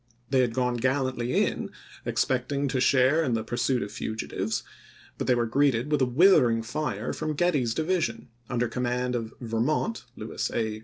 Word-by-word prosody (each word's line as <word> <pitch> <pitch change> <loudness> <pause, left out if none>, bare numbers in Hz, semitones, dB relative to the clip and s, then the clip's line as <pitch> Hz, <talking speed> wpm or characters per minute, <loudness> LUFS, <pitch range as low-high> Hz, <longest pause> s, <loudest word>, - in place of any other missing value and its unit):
They 135 - +4
had 120 -2 +1
gone 125 -1 +1
gallantly 130 -1 +1
in, - - -3 0.4
expecting 140 +2 0
to 130 0 0
share 135 +5 +4
in 125 -6 0
the 110 - -1
pursuit 120 +1 0
of 100 - -7
fugitives, 110 0 -3 0.6
but - - -2
they 125 - +4
were 120 -1 +1
greeted 135 +2 +1
with 150 - +2
a 130 - +4
withering 125 -6 +5
fire 120 -3 -3
from 155 -1 -3
Getty's 145 -9 +1
division 170 -3 -1
— 120 - -35
under 120 0 0
command 125 +1 -1
of 115 -2 -3
"Vermont 125 - -1
" 125 - -38
[Lewis 110 - -3
A. 110 -2 -1
125 Hz, 175 wpm, -27 LUFS, 115-140 Hz, 0.6 s, withering